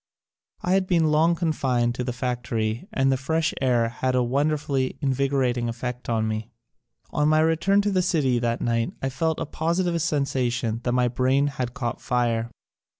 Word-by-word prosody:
I 180 - 0
had 190 0 +2
been 165 -4 +3
long 160 +3 +4
confined 130 -8 0
to 125 - -3
the 125 - -2
factory 120 - -2
and 135 0 +2
the 135 - +2
fresh 160 +5 0
air 120 -3 +2
had 130 +2 -1
a 125 - +3
wonderfully 140 0 0
invigorating 130 -3 0
effect 125 +1 -5
on 110 -1 +1
me. 110 +1 -3 0.6
On 150 0 +2
my 155 0 +4
return 165 +6 +3
to 205 - +1
the 185 -1 +2
city 150 -9 +1
that 115 0 -1
night 115 -1 0
I 135 - +1
felt 160 +4 -1
a - - -2
positive 170 +2 -1
sensation 130 -7 -1
that 120 - +1
my 125 0 +3
brain 130 +3 +2
had 130 -4 -3
caught 120 -4 -3
fire. 120 -2 0
130 Hz, 175 wpm, -24 LUFS, 120-155 Hz, 0.6 s, long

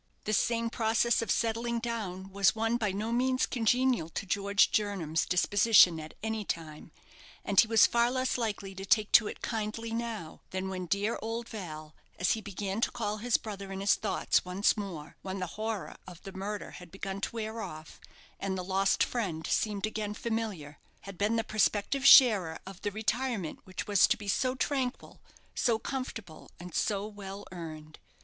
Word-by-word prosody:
This 215 -1 +2
same 230 -1 0
process 230 +1 +2
of 230 - -4
settling 230 +2 0
down 200 -5 -4
was 200 +1 +3
one 225 +1 +1
by 215 -4 0
no 210 +4 -3
means 255 +2 +2
congenial 245 -5 +1
to 185 - -4
George 200 +1 +2
Jernam's 190 -7 0
disposition 185 -1 +5
at 155 0 -9
any 220 -1 -2
time; 160 -3 -6 0.5
and 200 -2 +3
he 230 - +7
was 225 -1 +6
far 235 0 +3
less 255 0 0
likely 205 -5 -3
to 190 0 -7
take 210 +2 +2
to 215 - +7
it - - -8
kindly 225 0 -3
now, 225 -8 -4
than 190 0 -3
when 185 -1 -4
"dear 200 +5 0
old 230 +1 -4
Val" 155 -7 -7 0.2
as 180 - +2
he 220 - 0
began 200 +1 -4
to - - +2
call 210 -2 -3
his 235 +2 +2
brother 200 -3 -7
in 195 - -5
his 200 +1 +4
thoughts - - +1
once 185 +3 +2
more, 185 -8 -7
when 190 0 -5
the 185 - -2
horror 215 -2 -4
of 175 -2 -10
the 195 - -8
murder 205 +2 -5
had 180 -2 -12
begun 195 0 -5
to 230 - -3
wear 220 0 -4
off, 155 -5 -8 0.4
and 195 -1 -2
the 185 - -3
lost 195 +1 +2
friend 180 -10 -2
seemed 210 -2 0
again 215 -1 -3
familiar 210 -11 -4 0.2
had 195 -1 -9
been 205 +5 +1
the 225 - +1
prospective 215 +6 +1
sharer 200 -13 +7
of 190 -1 -10
the 205 - -1
retirement 220 -3 -2
which 185 - -5
was 205 -3 +5
to 240 - +1
be 205 -2 -9
so 255 +6 +1
tranquil, 265 -1 -2 0.3
so 235 -3 +2
comfortable, 225 - -6
and 175 -1 -9
so 200 -1 0
well 205 -1 -8
earned. 155 -3 -8
205 Hz, 185 wpm, -30 LUFS, 190-230 Hz, 0.5 s, he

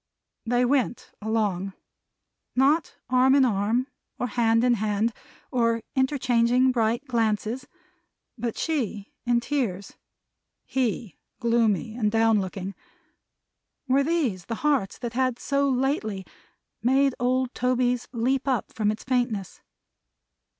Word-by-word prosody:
They 245 +1 +3
went 255 -2 0
along. 205 -3 -1 0.8
Not 285 +5 +2
arm 255 +1 +4
in 275 -2 +5
arm, 225 +3 +1 0.3
or - - -1
hand 230 0 +2
in 250 -1 +4
hand, 215 +1 0 0.4
or 230 -2 +1
interchanging 255 -2 +3
bright 235 +2 0
glances; 230 0 -1 0.7
but 235 -1 -3
she 225 -10 -2
in 240 -1 +3
tears; 235 -8 -2 0.7
he 235 - -2 0.2
gloomy 230 -3 +1
and 215 -3 0
down 225 -1 +3
looking. 190 +1 -5 1.1
Were 270 +2 +3
these 275 - 0
the 230 - -3
hearts 275 -10 +1
that 240 -2 -5
had 255 -1 +1
so 280 +1 +1
lately 250 -7 -1 0.6
made 265 +3 +3
old 255 +1 +1
Toby's 250 -1 +1
leap 260 +3 0
up 255 -6 -1
from 215 -2 +1
its 215 +1 -3
faintness? 245 -7 -1
240 Hz, 115 wpm, -26 LUFS, 220-260 Hz, 1.1 s, in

